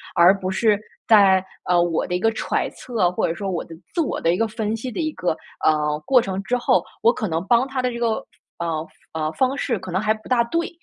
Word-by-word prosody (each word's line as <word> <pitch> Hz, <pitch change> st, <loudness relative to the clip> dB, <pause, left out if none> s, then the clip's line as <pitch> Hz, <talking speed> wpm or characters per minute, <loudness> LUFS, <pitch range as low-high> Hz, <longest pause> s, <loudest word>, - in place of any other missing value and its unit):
而 185 Hz, +3 st, +6 dB
不 185 Hz, 0 st, -2 dB
是 210 Hz, +1 st, +2 dB, 0.3 s
在 195 Hz, -4 st, +6 dB, 0.2 s
呃， 175 Hz, -1 st, +3 dB
我 170 Hz, -2 st, 0 dB
的 180 Hz, -, -4 dB
一 180 Hz, -, +1 dB
个 225 Hz, +4 st, +2 dB
揣 -, -, -1 dB
测， 215 Hz, -8 st, -1 dB
或 -, -, 0 dB
者 165 Hz, -, -1 dB
说 195 Hz, +3 st, -4 dB
我 175 Hz, -3 st, -3 dB
的 165 Hz, -, -11 dB, 0.2 s
自 340 Hz, -, 0 dB
我 305 Hz, -, -2 dB
的 165 Hz, -, +3 dB
一 -, -, -3 dB
个 225 Hz, -, +1 dB
分 220 Hz, 0 st, -2 dB
析 250 Hz, +3 st, -5 dB
的 -, -, -5 dB
一 310 Hz, -2 st, 0 dB
个， 175 Hz, -, -1 dB, 0.3 s
呃， 150 Hz, -1 st, +2 dB
过 260 Hz, -2 st, +5 dB
程 190 Hz, -2 st, -3 dB
之 245 Hz, +6 st, 0 dB
后， 245 Hz, -, +2 dB, 0.2 s
我 230 Hz, -, +5 dB
可 215 Hz, -, -3 dB
能 165 Hz, -1 st, -2 dB
帮 240 Hz, +4 st, +4 dB
他 270 Hz, -1 st, -2 dB
的 250 Hz, -, 0 dB
这 235 Hz, -, -5 dB
个， 230 Hz, -2 st, 0 dB, 0.4 s
呃 165 Hz, -2 st, -2 dB, 0.3 s
呃， 155 Hz, -1 st, -1 dB
方 265 Hz, -, +1 dB
式 250 Hz, -4 st, -1 dB
可 185 Hz, 0 st, -8 dB
能 185 Hz, -, +1 dB
还 215 Hz, +1 st, +2 dB
不 215 Hz, 0 st, -13 dB
大 245 Hz, -2 st, +4 dB
对。 335 Hz, +8 st, -1 dB
205 Hz, 270 characters per minute, -22 LUFS, 175-235 Hz, 0.4 s, 而